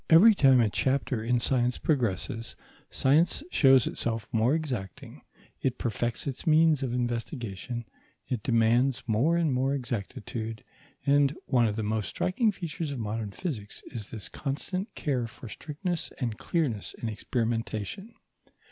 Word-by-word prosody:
Every 190 +8 +9
time 135 -8 +5
a 115 - +4
chapter 130 +1 0
in 120 +2 +2
science 125 0 +1
progresses, 115 - -1 0.3
science 155 - +3
shows 135 -4 +6
itself 115 -2 -2
more 115 +6 +3
exacting; 125 - -5 0.4
it 130 -2 0
perfects 120 +1 -2
its 140 +1 -5
means 155 -2 +5
of 130 -3 -1
investigation, 120 - -3 0.4
it 125 -4 -2
demands 120 +3 +3
more 125 +9 +2
and 160 -5 +2
more 135 +2 +1
exactitude, 115 -2 -4 0.4
and 140 0 +4
one 120 -3 +3
of 105 - -1
the 110 - -2
most 110 0 -1
striking 215 +4 +1
features 165 -4 -4
of 140 - -4
modern 110 -1 -3
physics 105 - -5
is 115 -6 -6
this 105 -5 -6
constant 185 - -4
care 130 -6 -1
for 115 +2 -11
strictness 160 - -4
and 115 -6 -3
clearness 135 - -1
in 115 - -4
experimentation. 115 - -3
125 Hz, 140 wpm, -28 LUFS, 115-145 Hz, 0.4 s, Every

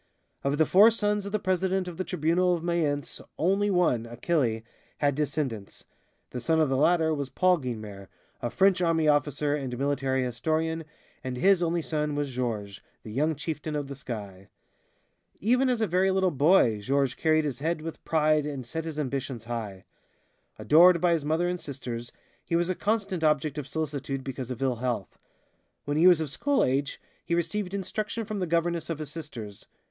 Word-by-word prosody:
Of 140 +1 0
the 160 - +4
four 205 +7 +7
sons 210 -2 -1
of - - -6
the 215 - +1
president 185 -1 0
of 175 -2 -7
the 185 - -1
Tribunal 180 +1 +1
of 165 - -6
Mayence, 155 -5 -1 0.2
only 195 +5 +2
one, 165 - +2
Achille, 120 -2 -1 0.3
had 145 -1 +2
descendants. 135 -8 -3 0.5
The 125 - -5
son 160 +4 +2
of 155 -3 +3
the 135 - +1
latter 160 +3 +3
was 140 -3 -3
Paul 185 +2 +3
Guynemer, 110 -7 -6 0.3
a 120 - -1
French 190 +4 +3
army 165 -2 +2
officer 145 0 +2
and 135 -4 -3
military 135 -1 0
historian, 160 +6 -1 0.4
and 130 -1 -4
his 190 +4 +4
only 170 -1 0
son 150 -2 -2
was 145 -2 -2
Georges, 110 -5 -3 0.2
the 110 - -8
young 150 +7 +1
chieftain 150 +1 -4
of 145 -1 -2
the 140 - -7
sky. 100 -7 -7 0.9
Even 250 +5 +2
as 245 -3 0
a - - +3
very 185 +1 +2
little 190 -1 +2
boy, 140 - +4
Georges 135 +3 +1
carried 155 -1 +2
his 140 -3 -3
head 160 +2 -1
with 165 0 -7
pride 155 -2 +2
and 140 -4 -5
set 160 +7 -5
his 160 -2 -5
ambitions 135 -4 -3
high. 110 -5 -6 0.7
Adored 170 +3 +6
by 175 -1 +3
his 160 -3 0
mother 160 +3 +1
and 180 0 -2
sisters, 120 -5 -6 0.3
he 170 - -2
was 175 +2 +1
a - - +1
constant 200 -3 -1
object 150 -1 +1
of 140 - -6
solicitude 140 -2 -3
because 130 -2 -5
of 125 +1 -4
ill 130 -3 +1
health. 120 -5 -3 0.7
When 145 - -1
he 165 +4 +5
was 175 -3 +7
of 155 -4 -3
school 285 - +1
age 135 +2 -1 0.2
he 170 - -1
received 180 +3 -2
instruction 215 +3 -3
from 210 -1 -4
the 180 - -1
governess 170 0 0
of 165 - -2
his 150 -1 -6
sisters. 120 -11 -8
155 Hz, 185 wpm, -27 LUFS, 130-175 Hz, 0.9 s, four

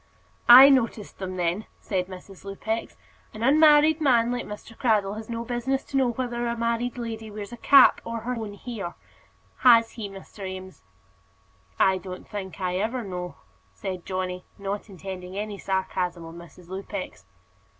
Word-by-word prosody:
"I 260 +3 +12
noticed 235 -6 0
them, 185 -1 -4
then," 180 +4 -1
said 185 -3 -2
Mrs. 190 0 -11
Lupex. 220 +3 -4 0.4
"An 215 - -5
unmarried 305 +3 +6
man 240 -5 +3
like 245 0 -3
Mr. 210 +2 -9
Cradell 210 -5 +1
has 220 +1 -8
no 230 0 -4
business 250 +3 -1
to - - -9
know 260 -2 +3
whether 240 0 -2
a 235 0 -2
married 235 +1 -1
lady 225 -2 -5
wears 210 0 -7
a 240 - -8
cap 275 +2 +6
or 230 -1 -5
her 245 +3 -3
own 220 -4 -5
hair 205 -6 -6 0.6
has 230 -3 +6
he, 215 -3 -6
Mr. 195 +1 -11
Eames?" 190 0 -7 1.0
"I 190 -1 +3
don't 185 -1 -9
think 190 -4 -7
I 180 -1 -1
ever 230 +5 -1
know," 180 -5 -6 0.4
said 185 -3 -5
Johnny, 185 -1 -3
not 200 +2 -5
intending 185 0 -8
any 205 -1 -4
sarcasm 185 -3 -2
on 165 0 -10
Mrs. 170 0 -13
Lupex. 190 - -6
210 Hz, 160 wpm, -25 LUFS, 185-235 Hz, 1.0 s, I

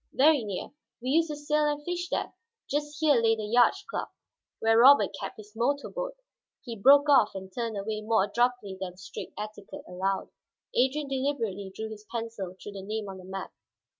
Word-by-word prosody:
"Very 290 -2 +5
near. 200 -3 -5 0.3
We 250 +1 -4
used 325 +3 +3
to 300 - -3
sail 300 +1 +1
and 295 0 -2
fish 350 0 -3
there. - - -2 0.3
Just 295 +1 -2
here 295 -6 +4
lay 225 0 +4
the 215 -1 -4
yacht 240 +3 +5
club, - - -4 0.5
where 225 0 +4
Robert 250 -5 +7
kept - - -6
his 210 -1 -13
motor 280 +5 0
boat - - -4 0.3
" - - -42
He 235 -2 -5
broke 280 +7 +6
off 270 -9 +5
and 190 -1 -8
turned 230 -2 -3
away 215 +2 -3
more 220 -2 +2
abruptly 240 -2 0
than 180 -1 -5
strict 185 - -8
etiquette 215 +6 -7
allowed. 190 +2 -2 0.4
Adrian 270 +4 +1
deliberately 235 -8 -2
drew 220 0 -4
his 210 -1 -10
pencil 225 -6 -4
through 205 - -9
the 195 -1 -7
name 210 +2 -4
on 190 -1 -8
the 185 - -12
map. 190 0 -6
230 Hz, 195 wpm, -28 LUFS, 205-285 Hz, 0.5 s, Robert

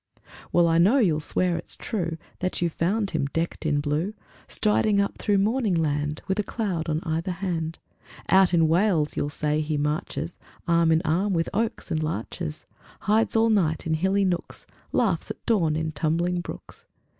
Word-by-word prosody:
IV - - -33 0.3
Well, 175 -1 +4
I 165 0 +3
know 200 +11 +5
you'll 175 - +3
swear 175 +3 0
it's - - -5
true 170 -7 -3 0.2
That 185 0 -2
you 170 -1 0
found 195 +6 0
him 140 - 0
decked 165 -1 -2
in 145 -1 +2
blue 155 +8 -1 0.3
Striding 210 -1 +2
up 200 - -1
through 205 -1 +2
morning 215 0 +1
land 150 -2 -1
With 190 +2 0
a - - +2
cloud 190 -7 -3
on 155 +1 0
either 165 +2 -2
hand. 170 -3 -3 0.5
Out 190 -1 +5
in 165 -2 +4
Wales, 165 -2 +2
you'll 145 - -1
say, 150 0 0
he 155 0 -1
marches 150 +3 -2 0.3
Arm 170 -1 +4
in 160 +2 +3
arm 185 +6 +1
with 165 -1 0
oaks 225 -2 -2
and 160 -1 0
larches; 115 - -4 0.4
Hides 220 +3 +2
all 225 0 +4
night 165 -7 +1
in 160 - 0
hilly 190 +5 +2
nooks, 175 -2 -3 0.3
Laughs 195 -9 +1
at - - -8
dawn 170 -9 +2
in 160 0 -1
tumbling 170 +4 0
brooks. - - -10
170 Hz, 180 wpm, -25 LUFS, 155-195 Hz, 0.5 s, know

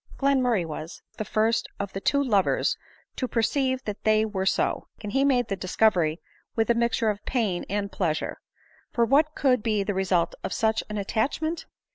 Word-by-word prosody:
Glenmurray 255 -9 +2
was 160 +1 -7 0.2
the - - 0
first 220 +3 +1
of 200 -1 -4
the 195 - -4
two 280 +5 +2
lovers 205 -8 +2 0.4
to 255 - -1
perceive 260 +3 0
that 210 -1 -5
they 215 0 +4
were 195 -3 -2
so; - - +1 0.2
and 205 - -4
he 270 +4 +2
made 250 -4 +3
the 195 - -1
discovery 185 -4 +2 0.4
with 225 +1 +2
a - - +5
mixture 235 -1 +1
of 205 0 -8
pain 215 -9 -1
and 200 0 -2
pleasure. 160 -5 -2 0.5
For 235 - +2
what 300 +5 +3
could 255 -4 +3
be 210 -2 +1
the 205 - -1
result 185 -3 +1
of - - -3
such 220 0 +1
an 210 - -3
attachment 285 - -1
220 Hz, 180 wpm, -26 LUFS, 195-250 Hz, 0.5 s, a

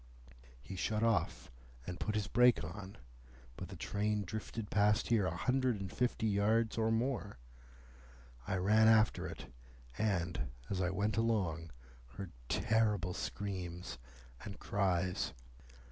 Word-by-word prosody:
He 65 +10 -8
shut 110 +4 0
off, 115 - +1 0.3
and 90 -1 -5
put 105 - -1
his 105 -2 0
brake 125 -1 +5
on, 95 +4 -7 0.6
but - - -6
the - - -9
train 105 0 -1
drifted 110 +2 -5
past 105 +2 +3
here 110 -5 +3
a 80 - -2
hundred 125 -1 +1
and 95 -1 -5
fifty 125 -2 0
yards 110 +2 +2
or 110 -1 +2
more. 115 - -1 1.1
I - - 0
ran 105 +4 +5
after 110 -1 +4
it, 65 - -9 0.5
and, 90 - 0 0.2
as 95 -1 0
I 90 - +2
went 100 +4 0
along, 95 -8 0 0.5
heard 95 -3 -6 0.2
terrible 105 -5 +2
screams 90 -5 -4 0.4
and 100 -1 -7
cries. 95 -2 0
105 Hz, 130 wpm, -35 LUFS, 90-110 Hz, 1.1 s, brake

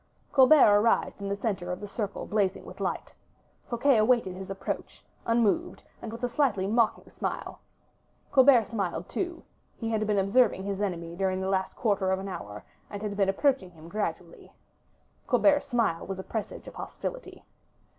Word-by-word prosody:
'" - - -38
Colbert 260 -6 +7
arrived 225 -2 +1
in 200 - -3
the 200 - 0
center 195 -4 -3
of 180 - -4
the 205 - -7
circle 205 -1 -4
blazing 200 -3 0
with - - -11
light; - - -3 0.6
Fouquet 240 +2 +3
awaited 220 -3 +3
his 190 +1 -8
approach, 195 0 -5 0.2
unmoved 235 - +1 0.2
and 225 - -6
with 230 +2 -9
a - - +2
slightly 245 -7 +1
mocking 225 +2 +1
smile. - - -4 0.7
Colbert 260 -3 +7
smiled 195 -6 -3
too; 345 -2 -4 0.3
he 225 -1 -3
had 215 -1 0
been 210 -1 +1
observing 200 +1 +3
his 200 0 -3
enemy 170 -4 -3
during 190 0 0
the 190 0 -2
last 190 -1 -1
quarter 200 -5 +1
of 190 - +2
an 195 +1 -6
hour, 105 - -7 0.3
and 205 0 -6
had 205 -1 -3
been 195 -1 +2
approaching 255 -1 +1
him 165 -2 -14
gradually. 170 -3 -5 0.8
Colbert's 290 -1 +3
smile 230 -10 0
was 195 0 -4
a 190 - -6
presage 220 0 -5
of - - -9
hostility. - - -7
205 Hz, 175 wpm, -28 LUFS, 190-235 Hz, 0.8 s, Colbert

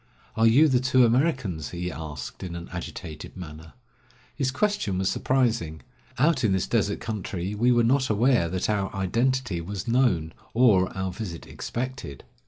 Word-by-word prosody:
"Are 115 +1 +4
you 140 +8 +6
the 130 -4 +3
two 130 0 +4
Americans?" 120 - 0
he 90 0 -4
asked 75 -3 -7
in 90 -2 -5
an 85 0 -7
agitated 85 -3 -7
manner. 80 -2 -9 0.6
His 135 -3 0
question 130 - 0
was 95 0 +1
surprising. 110 - 0 0.4
Out 140 0 +3
in 105 -4 +3
this 95 - +1
desert 105 -3 0
country 100 -3 -4
we 120 +4 +3
were 120 -1 +4
not 130 +3 +2
aware 110 -4 +3
that 90 +1 -1
our 100 -2 0
identity 115 0 0
was 100 +4 -6
known, 115 -10 +2 0.2
or 105 -7 +4
our 95 -1 -2
visit 90 -4 -6
expected. 125 - -5
105 Hz, 160 wpm, -26 LUFS, 90-125 Hz, 0.6 s, you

